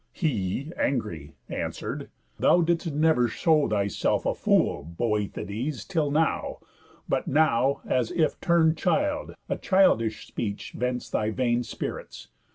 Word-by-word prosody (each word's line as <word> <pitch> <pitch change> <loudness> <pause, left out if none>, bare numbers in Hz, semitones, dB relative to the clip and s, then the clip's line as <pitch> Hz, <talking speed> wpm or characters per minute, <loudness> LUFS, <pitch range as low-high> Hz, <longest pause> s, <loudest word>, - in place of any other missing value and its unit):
He, 135 - -1
angry, 95 - -2
answer'd: - - -4 0.3
"Thou 175 - +5
didst 170 0 0
never 150 -4 +3
show 155 +5 +2
Thyself 100 -3 0
a - - +2
fool, 70 - +2
Boethides, 110 +4 -2
till 160 -6 0
now; 155 +3 0 0.5
But - - -1
now, 140 -2 +2
as 125 -3 +1
if 160 -3 0
turn'd 165 -2 +3
child, 295 +11 0
a - - -1
childish 115 - +3
speech 105 -2 -4
Vents 125 +1 -2
thy 110 - 0
vain 120 +1 +1
spirits. 115 - -6
130 Hz, 125 wpm, -26 LUFS, 110-160 Hz, 0.5 s, Thou